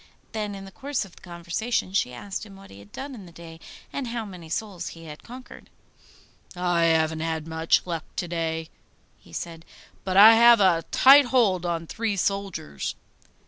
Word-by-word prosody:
Then 210 -2 -4
in 195 0 -9
the 195 - -12
course 275 +1 -3
of 185 - -17
the - - -18
conversation 180 +4 -3
she 160 -10 +1
asked 195 - -6
him 200 -2 -12
what 195 0 -15
he 100 - -13
had 100 0 -16
done 275 +1 -7
in 205 -7 -10
the - - -14
day, 165 -1 -12 0.3
and 275 -3 -3
how 230 -1 -4
many 180 -5 -11
souls 185 -1 -4
he 165 -1 -10
had 150 -1 -10
conquered. 250 +2 -12 0.9
'I 175 -1 0
haven't 160 -1 +2
had 160 -1 -3
much 160 0 +1
luck 165 -3 -4
to 175 - -3
day,' 165 -1 -3 0.5
he - - -20
said, 165 -1 -6 0.4
'but 190 -1 -1
I 215 +3 +10
have 235 0 +7
a 175 -4 +3
tight 275 +2 +7
hold 210 -9 +2
on 165 -1 -2
three 220 +4 -2
soldiers. 195 - -3
180 Hz, 185 wpm, -25 LUFS, 165-215 Hz, 0.9 s, I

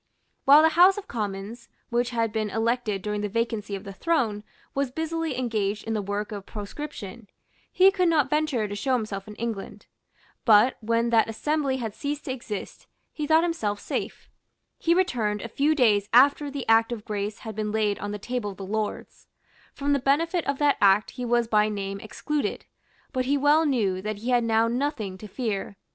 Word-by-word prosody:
While 290 +3 +8
the 320 - +6
House 360 +5 +6
of 410 - -7
Commons, 210 +1 -5 0.2
which 240 +1 +1
had 230 -3 -1
been 215 -1 -1
elected 225 -2 -1
during 210 0 -2
the 210 - -2
vacancy 220 -2 -2
of 195 - -7
the 200 -2 -8
throne, 225 - 0 0.3
was 275 -1 0
busily 320 0 -3
engaged 215 -4 -1
in 225 - -3
the 215 - 0
work 205 +2 -3
of 200 -2 -7
proscription, 220 -1 -7 0.4
he 380 +1 +6
could 365 -2 +1
not 305 -5 +3
venture 300 -7 0
to 205 - -6
show 260 +6 -1
himself 215 -4 -4
in 210 - -9
England. 225 -3 -5 0.6
But 220 +3 +5
when 230 +1 +1
that 225 -1 +4
assembly 280 +3 -1
had 225 -5 -4
ceased 285 +4 -4
to 265 - -3
exist, 230 -6 -6 0.3
he 300 -1 -3
thought 320 +1 +5
himself 220 -13 -1
safe. - - -5 0.5
He 335 +1 +2
returned 235 - 0
a - - -4
few 290 +7 +1
days 210 -7 +3
after 285 +4 +5
the 280 -2 -5
Act 225 +1 +4
of 220 -3 -5
Grace 210 0 -3
had 220 -2 -6
been 210 -1 -2
laid 210 -2 0
on 205 - -4
the 210 - -4
table 235 +1 -3
of 195 - -9
the 195 - -6
Lords. 215 +2 -4 0.4
From 285 0 -1
the 280 - +2
benefit 325 +6 +1
of 280 0 0
that 290 -1 +3
Act 200 +1 +4
he 250 -1 -5
was 240 -1 +2
by 215 -1 +3
name 200 -1 -4
excluded; 290 +8 -3 0.5
but 255 -1 0
he 280 +2 +2
well 295 +3 +4
knew 200 -9 0
that 210 +1 -4
he 235 +5 -3
had 245 -1 +3
now 225 0 +3
nothing 240 -5 -2
to 215 - -9
fear. 205 -3 -4
230 Hz, 195 wpm, -26 LUFS, 210-280 Hz, 0.6 s, While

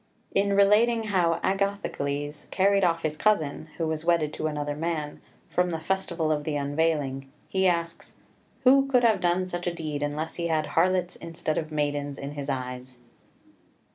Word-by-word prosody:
In 200 0 +2
relating 220 +4 +4
how 180 -6 +1
Agathocles 150 -7 -2
carried 195 +1 +3
off 165 -2 +2
his 155 -1 -1
cousin, 155 -6 +1
who 165 - -1
was 160 0 -2
wedded 165 -3 +2
to 155 - -2
another 145 -1 -3
man, 155 -1 -3 0.3
from 180 0 +1
the 165 -2 -2
festival 170 -2 -1
of 150 -1 0
the 150 0 -2
unveiling, 140 -2 -1 0.2
he 190 0 +2
asks, 170 -1 -2 0.5
"Who 270 +2 +6
could 250 -2 +3
have 225 -2 +4
done 180 +1 +2
such 175 -1 -4
a 175 - 0
deed, 155 -3 -4
unless 150 +2 -3
he 170 -1 -1
had 155 -2 +1
harlots 180 +2 +1
instead 165 -2 -3
of 155 -1 -6
maidens 145 -2 -1
in 140 +1 -6
his 145 -1 -5
eyes?" 125 -1 -5
165 Hz, 170 wpm, -27 LUFS, 145-185 Hz, 0.5 s, Who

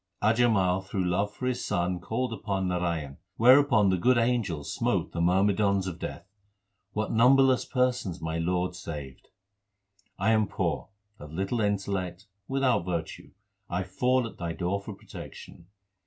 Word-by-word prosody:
Ajamal 110 -5 +3
through 95 -1 -3
love 100 +4 0
for 125 - -6
his 125 -1 -1
son 90 -2 -1
called 115 +6 -2
upon 100 -4 -2
Narayan, 85 -6 -2 0.2
whereupon 125 -4 +6
the 95 - +2
good 125 +7 +4
angels 115 -11 0
smote - - 0
the 85 - -3
myrmidons 100 +2 +2
of 90 -2 -5
Death. 85 - -6 0.7
What 110 +1 -2
numberless 130 +3 +5
persons 125 -9 0
my 80 +1 -3
Lord 90 +2 0
saved! 75 -7 -8 0.9
I 100 +4 +2
am 110 -2 +3
poor, - - -2 0.3
of 75 0 -10
little 95 +8 -1
intellect, 100 -3 -2 0.2
without 135 -6 +1
virtue; 85 -2 -4 0.4
I 90 +2 -1
fall 125 +7 +1
at 115 - -9
Thy 85 -1 -3
door 90 +3 -2
for 100 0 -8
protection. 85 - -11
95 Hz, 145 wpm, -28 LUFS, 90-115 Hz, 0.9 s, whereupon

